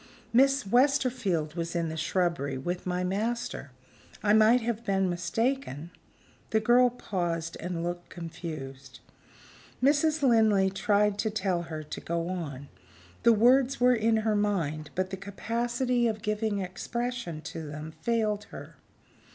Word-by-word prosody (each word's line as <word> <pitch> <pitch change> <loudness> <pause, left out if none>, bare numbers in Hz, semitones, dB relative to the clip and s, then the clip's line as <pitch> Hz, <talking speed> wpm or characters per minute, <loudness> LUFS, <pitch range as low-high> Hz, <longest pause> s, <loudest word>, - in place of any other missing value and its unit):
"Miss 270 +1 +4
Westerfield 245 - +2
was 170 0 -4
in 170 -1 0
the 160 - -5
shrubbery, 160 -4 -1
with 175 +7 -4
my 180 0 -1
master. 220 - -2 0.5
I 205 0 +4
might 220 +3 +6
have 230 0 -2
been 195 -4 +1
mistaken 175 - -2 0.3
" - - -31
The 220 - +2
girl 245 +3 +5
paused, 170 -8 -3
and 175 -1 -3
looked 175 0 -4
confused. 155 -6 -8 0.8
Mrs. 295 +3 +2
Linley 215 -6 +4
tried 205 0 +1
to 220 - +1
tell 190 -4 -1
her 160 -2 -6
to 150 - -7
go 170 +1 -2
on. 145 -7 -5 0.5
The 235 - +6
words 255 +4 +4
were 250 0 +5
in 225 -1 +2
her 215 -1 +2
mind; 165 -8 -1
but 185 +1 -1
the 190 - -4
capacity 240 +5 -1
of 215 -1 -3
giving 215 -1 -1
expression 200 -1 -4
to 165 - -7
them 150 +2 -7
failed 215 -2 0
her. - - -11
200 Hz, 145 wpm, -28 LUFS, 170-235 Hz, 0.8 s, might